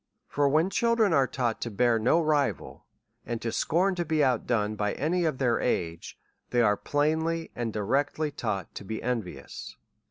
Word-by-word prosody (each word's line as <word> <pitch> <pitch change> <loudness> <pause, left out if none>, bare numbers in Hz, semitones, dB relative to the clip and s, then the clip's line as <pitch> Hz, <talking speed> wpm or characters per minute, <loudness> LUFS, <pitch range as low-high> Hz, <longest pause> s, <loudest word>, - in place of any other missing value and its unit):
For 145 -1 +1
when 160 +6 +2
children 230 -2 +2
are 135 -3 +4
taught 120 -4 -2
to 120 - -2
bear 115 +2 +2
no 125 +9 +3
rivals 145 - 0 0.4
and 120 -1 -4
to 115 - -1
scorn 185 +10 +1
to 175 -1 -1
be 155 -2 +1
out 130 -4 +1
done 110 -3 0
by 105 -1 -1
any 170 +4 0
of 155 -5 0
their 125 -3 +2
age^ 85 -8 -2 0.3
they 120 -1 +3
are 105 -2 +4
plainly 160 +6 0
and 120 -2 -2
directly 140 +8 0
taufflit 105 -8 -4
to - - -7
be 110 +3 -5
envious. 100 - -5
130 Hz, 180 wpm, -28 LUFS, 110-155 Hz, 0.4 s, are